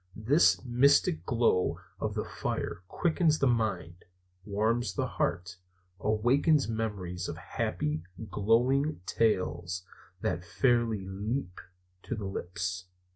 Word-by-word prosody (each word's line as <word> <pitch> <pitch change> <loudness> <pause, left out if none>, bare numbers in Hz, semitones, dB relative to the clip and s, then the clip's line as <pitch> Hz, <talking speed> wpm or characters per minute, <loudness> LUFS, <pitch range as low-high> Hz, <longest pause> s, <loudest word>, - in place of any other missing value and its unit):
The 130 +10 +4
mystic 120 - +3
glow 115 -6 +2 0.2
of - - -2
the - - -2
fire - - -3
quickens 165 - +2
the 140 - +1
mind, 100 -8 0 0.4
warms 110 +1 0
the - - 0
heart, 90 +1 -2 0.4
awakens 130 +8 +3
memories 100 -6 -3
of - - -5
happy, 75 +1 -2 0.3
glowing 125 - +2
tales 90 -5 0 0.4
that 85 - -1
fairly 115 0 +1
leap 100 +1 -3 0.4
to 120 - -4
the 105 -2 -5
lips. 90 -1 -4
110 Hz, 110 wpm, -30 LUFS, 90-120 Hz, 0.4 s, The